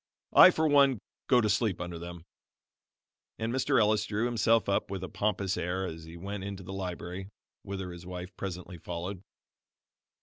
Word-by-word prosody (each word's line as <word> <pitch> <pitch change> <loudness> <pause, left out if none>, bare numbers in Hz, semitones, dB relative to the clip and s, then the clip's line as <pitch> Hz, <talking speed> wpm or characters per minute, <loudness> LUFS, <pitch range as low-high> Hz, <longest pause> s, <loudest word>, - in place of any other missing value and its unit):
I, - - +10
for 160 0 +1
one, 140 -3 +5 0.3
go 125 -2 +5
to 110 - +1
sleep 105 -2 +1
under 85 -1 -5
them." 85 -1 -8 1.1
And 115 +1 -2
Mr. 130 0 +2
Ellis 105 -1 +3
drew 105 +2 -1
himself 115 -1 +3
up 100 - +1
with 95 -1 -4
a - - -3
pompous 100 -2 -1
air 90 +2 -1
as 80 -2 -7
he 80 +1 -10
went 100 +2 -5
into 100 -1 -6
the 95 +1 -7
library, 95 0 -5 0.3
whither 95 -2 -5
his 85 0 -9
wife 90 0 -7
presently 90 -2 -6
followed. 90 +3 -5
95 Hz, 170 wpm, -30 LUFS, 90-110 Hz, 1.1 s, I